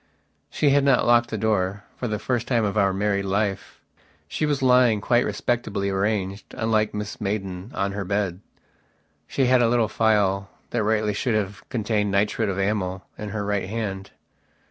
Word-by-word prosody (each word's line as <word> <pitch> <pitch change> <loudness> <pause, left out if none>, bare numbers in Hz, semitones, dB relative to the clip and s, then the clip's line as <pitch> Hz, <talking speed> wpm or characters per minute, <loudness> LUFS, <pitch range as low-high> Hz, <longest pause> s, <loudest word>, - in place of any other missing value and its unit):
She 145 - +2
had 140 0 +4
not 135 -2 +4
locked 120 0 +4
the 110 - -3
doorfor 100 +2 -2
the 105 -1 -1
first 120 +2 -2
time 115 -4 +2
of 100 - -2
our 100 -2 +3
married 100 0 0
life. 100 0 -2 0.5
She 155 - -1
was 140 -2 0
lying, 125 -4 +5
quite 120 +4 +2
respectably 100 -5 -1
arranged, 100 0 -2
unlike 110 -1 +1
Mrs 105 +1 -5
Maidan, 95 -1 -3
on 100 0 0
her 100 0 -3
bed. 95 -2 -1 0.9
She 135 - +1
had 125 0 +4
a 115 - +4
little 115 -2 +2
phial 100 -4 +1 0.2
that 120 - 0
rightly 105 0 +1
should 115 +3 0
have 100 -1 -3
contained 105 -3 0
nitrate 105 +2 +1
of 95 - -2
amyl, 95 -2 -1
in 105 - -5
her 105 -1 -3
right 100 -2 -1
hand. 100 -3 -4
105 Hz, 170 wpm, -24 LUFS, 100-115 Hz, 0.9 s, lying